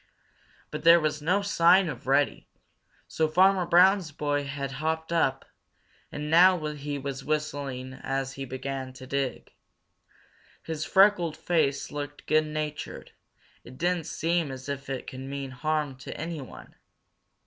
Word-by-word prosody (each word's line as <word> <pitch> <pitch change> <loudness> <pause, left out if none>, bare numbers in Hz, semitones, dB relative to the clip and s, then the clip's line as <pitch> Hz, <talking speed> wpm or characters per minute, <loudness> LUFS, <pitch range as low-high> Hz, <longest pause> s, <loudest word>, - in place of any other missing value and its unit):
But - - -5
there 170 +1 +8
was 155 -1 -1
no 185 +6 +1
sign 185 -1 +4
of 130 -5 -7
Reddy, 140 +1 +1 0.6
so 160 - 0
Farmer 185 +2 +4
Brown's 180 -1 +5
boy 145 0 -1
had 140 -1 -4
hopped 160 +1 -2
up, 135 -5 +1 0.7
and 150 +1 -5
now 175 -1 +6
he 145 0 -5
was 135 -1 -5
whistling 140 -4 -3
as 135 0 -3
he 135 - -6
began 130 0 -5
to 130 0 -11
dig. 135 0 -3 1.1
His 155 -1 -4
freckled 190 -5 +4
face 155 -5 0
looked 145 0 -6
good 155 0 +2
natured. 150 -1 -5 0.5
It 130 +1 -13
didn't 175 -1 0
seem 165 -1 0
as 130 0 -8
if 140 -1 -5
he 135 -2 -4
could 130 - -9
mean 135 0 -5
harm 150 +1 -1
to 130 - -8
anyone. 160 -4 -7
150 Hz, 140 wpm, -27 LUFS, 135-165 Hz, 1.1 s, there